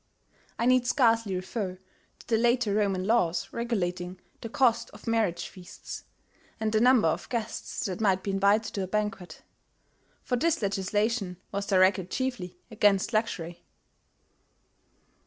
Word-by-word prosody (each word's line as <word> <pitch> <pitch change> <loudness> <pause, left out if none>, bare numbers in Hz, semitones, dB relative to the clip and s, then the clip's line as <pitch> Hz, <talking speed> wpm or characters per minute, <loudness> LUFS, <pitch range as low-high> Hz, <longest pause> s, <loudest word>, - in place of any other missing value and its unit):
(I 235 - 0
need 255 0 +4
scarcely 230 -6 +3
refer 185 0 -4 0.4
to - - -18
the 230 - +2
later 240 -2 +2
Roman 195 -3 +1
laws 180 -6 +1
regulating 185 -6 -2 0.2
the 230 - -6
cost 235 -1 +2
of - - -14
marriage 220 -7 0
feasts, 180 -2 -10 0.5
and 220 0 0
the 215 0 +2
number 250 -6 +5
of 160 - -2
guests 230 -1 -3
that 190 0 -3
might 190 -3 +2
be 200 - -2
invited 200 +3 +2
to 200 - -2
a 190 - -2
banquet; 210 -2 -3 0.8
for 250 - 0
this 330 +6 +1
legislation 200 0 -1
was 200 0 -3
directed 185 -1 +3
chiefly 225 -10 -3
against 205 0 +2
luxury.) 175 -6 -2
210 Hz, 140 wpm, -28 LUFS, 185-230 Hz, 0.8 s, number